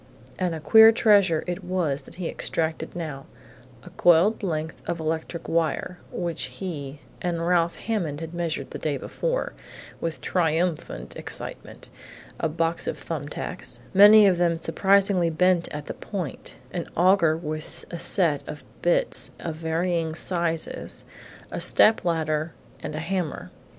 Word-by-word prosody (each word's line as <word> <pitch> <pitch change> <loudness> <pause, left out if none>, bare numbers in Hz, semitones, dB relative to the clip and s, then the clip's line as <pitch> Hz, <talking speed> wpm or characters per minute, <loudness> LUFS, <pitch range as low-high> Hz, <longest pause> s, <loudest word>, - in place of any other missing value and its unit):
And 165 -4 -2
queer 220 +3 +8
treasure 205 -8 +4
it 180 +2 -4
was 175 -6 -1
that - - -13
he 180 -2 -4
extracted 160 +1 -2
now 155 -6 -6 0.6
a - - -12
coiled 175 +6 +4
length 160 -4 -3
of 170 - -2
electric 160 +1 -3
wire, 170 +2 -1
which 170 -5 -3
he 140 0 -6 0.2
and 170 -2 -1
Ralph 170 -1 +2
Hammond 175 -11 -2
had 165 0 -7
measured 165 -5 -3
the - - -6
day 150 -3 -1
before, - - -2 0.5
with 165 -1 -3
triumphant 165 -1 -1
excitement; - - -7 0.5
a 160 - 0
box 165 +1 -1
of - - -2
thumb 150 -4 -5
tacks, 180 +4 -5
many 205 +2 +9
of 185 -3 +3
them 170 -1 +2
surprisingly 195 0 +2
bent 175 +1 +2
at 150 0 -6
the - - -5
point; 185 -9 -6 0.2
an 175 - -4
augur 175 -3 +4
with 155 -1 -4
a 170 - -5
set 165 -8 +2
of 150 - -7 0.2
bits 175 - +3
of 160 -2 -5
varying 165 0 -1
sizes, 170 -2 -3 0.5
a - - -4
step 220 +1 +4
ladder, 160 -2 -1 0.3
and 150 - -5
a - - -3
hammer. 170 -1 -3
170 Hz, 145 wpm, -25 LUFS, 160-180 Hz, 0.6 s, many